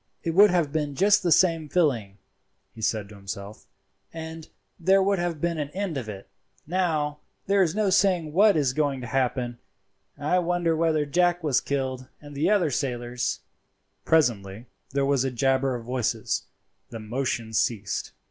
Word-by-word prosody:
"It 165 - -1
would 205 +5 +7
have 170 -6 +1
been 150 -3 -2
just 205 +5 +4
the 175 - 0
same 165 -4 +3
feeling," 120 - 0 0.6
he 110 - -11
said 110 -1 -1
to 105 - -12
himself, 100 +1 -8 0.4
"and 160 -1 -8 0.3
there 190 +3 +4
would 200 -1 +1
have 175 -3 -2
been 170 0 -1
an 145 -1 -3
end 195 -4 -2
of 125 -5 -4
it. 100 -2 -8 0.4
Now, 155 -4 -1 0.3
there 200 0 +3
is 175 -1 +1
no 210 -2 +1
saying 180 -6 +2
what 200 0 +5
is 135 -4 +1
going 140 -2 0
to - - -6
happen. 125 -1 -1 0.6
I 150 +5 +1
wonder 175 -1 0
whether 160 -2 +1
Jack 175 +3 +1
was 140 -5 +2
killed, 130 -2 -3
and 145 -1 -12
the 170 +2 +2
sailors." 125 -2 -2 0.6
Presently 115 -8 +1 0.2
there 140 0 0
was 140 -2 +2
a 135 - 0
jabber 130 +1 +1
of 115 -1 -7
voices; 125 -1 -1 0.4
the 115 - -7
motion 115 0 -3
ceased. 110 -3 -1
145 Hz, 165 wpm, -25 LUFS, 125-170 Hz, 0.6 s, would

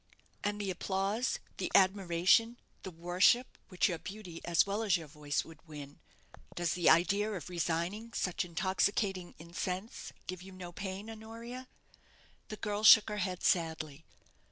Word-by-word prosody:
"And 205 0 -1
the 200 -2 -1
applause, 195 +6 -1 0.2
the - - -3
admiration, 190 +4 +4 0.2
the 190 - -6
worship, 180 +8 +2
which 185 -1 +2
your 175 -4 -2
beauty, 190 -4 -8
as 170 -1 +4
well 200 +2 -2
as 200 -4 +3
your 165 - -8
voice, 145 0 -2
would 165 -2 -13
win 145 -1 -9 0.6
does 175 -2 0
the 175 -2 +3
idea 200 +5 +4
of 180 -3 -6
resigning 175 +6 -2
such 180 -2 -1
intoxicating 190 +1 0
incense 180 +5 -5
give 185 -1 -6
you 190 +1 -11
no 180 -1 -8
pain, 190 +3 -6
Honoria?" 230 +3 -8 0.8
The 215 - -7
girl 210 -1 -3
shook 220 0 +9
her 210 - -3
head 185 -2 -2
sadly. 160 -3 0
185 Hz, 150 wpm, -32 LUFS, 170-210 Hz, 0.8 s, shook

